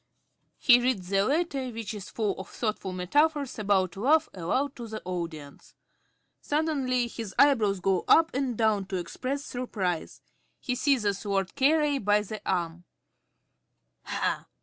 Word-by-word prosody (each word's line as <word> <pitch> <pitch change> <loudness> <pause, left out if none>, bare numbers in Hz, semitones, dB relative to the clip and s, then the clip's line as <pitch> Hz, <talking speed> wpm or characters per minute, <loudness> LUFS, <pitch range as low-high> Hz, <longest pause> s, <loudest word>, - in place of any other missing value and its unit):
(_He 245 -3 +6
reads 230 -8 -1
the 195 0 +3
letter, 275 0 0
which 225 -2 -5
is 205 -2 -8
full 210 -4 -1
of 190 - -8
thoughtful 210 -4 -3
metaphors 280 - +1
about 195 -3 +1
love, 285 +11 +3
aloud 255 +11 -1
to 235 -2 -7
the 220 0 -6
audience. 165 -5 -6 0.7
Suddenly 280 -5 0
his 225 -4 -7
eyebrows 225 -9 +4
go 190 -1 +1
up 325 0 +5
and 255 -4 -1
down 215 -3 +2
to 190 - -5
express 255 - -4
surprise. 195 -9 -3 0.4
He 250 - -2
seizes_ 245 -7 +1
Lord 195 -3 -1
Carey 295 0 +3
by 210 -1 +3
the 215 +1 -7
arm.) 175 -2 -1 1.2
Ha! - - -2
220 Hz, 140 wpm, -28 LUFS, 190-270 Hz, 1.2 s, He